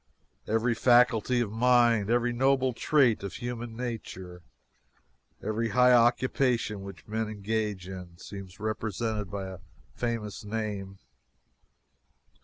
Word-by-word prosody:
Every 115 +2 +1
faculty 120 0 +4
of 110 -4 -2
mind, 120 -2 +3
every 120 +1 +2
noble 130 +1 +2
trait 125 -2 +3
of 100 -3 -6
human 120 -1 -5
nature, 95 -7 -6 1.0
every 110 +2 -1
high 125 +1 +5
occupation 120 -2 +2
which 95 -5 -10
men 110 0 -2
engage 105 -2 -2
in, 90 -2 -9
seems 95 0 -10
represented 110 -1 -2
by 100 0 -4
a 95 -1 -9 0.3
famous 115 -4 -3
name. 105 -2 -4
110 Hz, 110 wpm, -28 LUFS, 100-120 Hz, 1.0 s, high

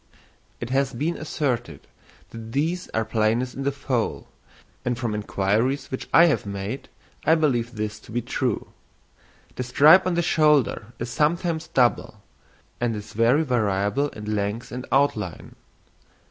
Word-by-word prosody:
It 120 +1 -5
has 135 0 +1
been 155 +8 -1
asserted 135 -6 -3 0.5
that 115 0 -9
these 165 +6 -1
are 110 0 -1
plainest 115 +3 0
in 135 - -6
the 140 +1 0
foal, 130 -4 -2 0.6
and 120 -1 -1
from 120 -3 -2
inquiries 105 +6 0
which 130 - -5
I 170 - +7
have 160 - +2
made, 100 +5 -5 0.3
I 160 +2 +5
believe 125 -7 0
this 105 -1 -4
to - - -15
be 120 +1 -2
true. 120 -1 -2 0.9
The - - -2
stripe 155 +9 +6
on 180 - 0
the 170 - +1
shoulder 150 -9 +2
is 120 0 -5
sometimes 160 +3 0
double, 120 -4 +1 0.6
and 120 -2 0
is 105 0 -8
very 120 +8 +3
variable 110 +1 0
in 105 -2 -5
length 105 +3 -3
and 125 +1 -6
outline. 110 - 0
125 Hz, 145 wpm, -24 LUFS, 110-145 Hz, 0.9 s, I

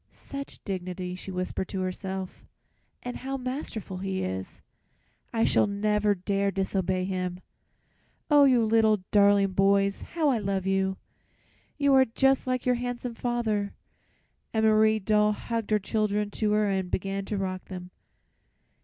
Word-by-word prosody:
"Such 275 0 -8
dignity," 185 -2 -4
she 185 +1 -8
whispered 185 0 -3
to 190 - -3
herself, 190 0 -5 0.6
"and 245 0 -5
how 270 +1 -4
masterful 255 -7 -5
he 190 0 -2
is. 95 0 -5 0.7
I 225 -1 +1
shall - - +3
never 210 0 +1
dare 200 +2 0
disobey 190 -1 -1
him. 180 -1 -3 0.9
"Oh, 290 -2 +6
you 250 -4 +4
little 220 -3 +3
darling 200 -1 +5
boys! 195 +1 +2
How 320 -3 0
I 250 -4 +2
love 195 -2 -2
you! 190 0 +1 0.8
You 280 -1 +3
are 265 -1 +6
just 270 +3 +2
like 255 -1 -1
your 250 - +4
handsome 245 -1 -4
father." 225 -4 -1 0.8
And 220 -1 +1
Marie 215 0 +5
Doll 210 0 +2
hugged 230 0 -4
her 215 - +4
children 210 0 -1
to 210 -1 0
her 210 0 +3
and 190 -2 -1
began 195 +2 -2
to 210 - -3
rock 185 -1 -3
them. 180 -1 -8
205 Hz, 145 wpm, -27 LUFS, 190-225 Hz, 0.9 s, Oh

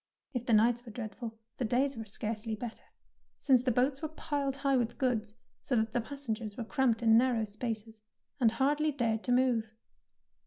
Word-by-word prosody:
If 250 -1 -3
the 235 - +3
nights 235 +3 +4
were 235 - -10
dreadful, 225 0 -6 0.2
the - - 0
days 255 +5 +1
were 225 -1 -6
scarcely 220 +1 -3
better, 230 +1 -7 0.5
since 260 -4 +4
the 255 0 +1
boats 260 +3 +1
were 315 - -1
piled 290 -3 -2
high 275 -1 +1
with 240 -2 0
goods, 225 -5 0 0.3
so 260 - -1
that 220 -1 +1
the 240 - +1
passengers 225 -5 -5
were 235 - -2
cramped 235 -1 +1
in 225 0 +7
narrow 240 -3 +2
spaces 220 0 -5 0.4
and 230 -3 +4
hardly 295 +4 +2
dared 230 -5 0
to 245 - 0
move. 245 -3 +3
240 Hz, 185 wpm, -31 LUFS, 220-265 Hz, 0.5 s, in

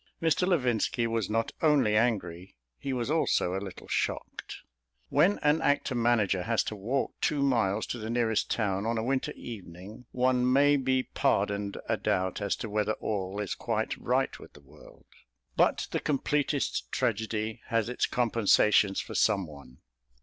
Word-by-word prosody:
Mr. 165 +2 +1
Levinski 125 - +1
was 115 -3 -1
not 115 +1 0
only 145 -9 +3
angry; 95 - -1 0.2
he 140 - -4
was 125 +1 -2
also 155 - +1
a 95 - -2
little 95 -2 -9
shocked. - - -3 0.5
When 200 +3 +3
an 150 +2 +3
actor 145 -2 +1
manager 115 -6 +2
has 115 +4 +1
to 110 - -5
walk 115 +7 -2
two 145 -2 +1
miles 110 -6 +1
to 120 - -5
the 110 0 -5
nearest 115 -2 0
town 100 -2 -1
on 115 0 0
a 110 - -1
winter 130 +2 -1
evening, 105 +2 -10
one 125 0 +2
may 145 +2 +5
be 130 -1 +1
pardoned 100 -7 0
a - - +1
doubt 95 +2 -1
as 100 -1 0
to - - -6
whether 105 0 0
all 100 -2 -3
is 105 -3 -2
quite - - -2
right - - -1
with - - -14
the 75 - -16
world. 70 - -18 0.5
But - - +2
the - - 0
completest 145 - -1
tragedy 110 +1 -2
has 115 -1 0
its 125 - 0
compensations 105 -4 +3
for - - -9
some 100 -4 +2
one. 70 -5 -14
115 Hz, 165 wpm, -29 LUFS, 100-130 Hz, 0.5 s, may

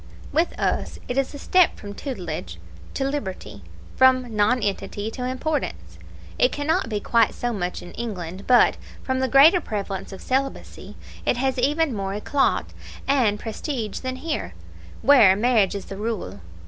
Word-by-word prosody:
With 330 +2 0
us - - -1
it 245 - -3
is 270 -1 0
a 285 - -8
step 365 +4 +3
from 205 0 -8
tutelage 175 - -6 0.4
to - - -1
liberty 190 - -5 0.3
from 255 -3 +4
nonentity 205 -1 0
to 250 - -6
importance. 270 +4 -3 0.4
It - - +4
cannot 290 -4 0
be 210 -2 -1
quite 230 +1 +2
so 240 -1 -2
much 180 -4 -3
so - - -10
in - - -10
England; 190 -5 -6
but, 250 -1 +5 0.3
from 260 0 -1
the 260 - +1
greater 305 +8 +6
prevalence 195 -5 -4
of 190 - -8
celibacy, 270 +1 -3 0.3
it - - +1
has 265 0 0
even 295 +2 +1
more 195 -1 -3
ECLAT 270 +6 0 0.3
and 235 -7 +2
prestige 225 -1 -4
than 255 -1 -4
here, 300 +4 -4 0.5
where 235 -10 +7
marriage 215 -3 +2
is 200 - -5
the 195 - -8
rule. 205 - -4
240 Hz, 160 wpm, -23 LUFS, 200-275 Hz, 0.5 s, where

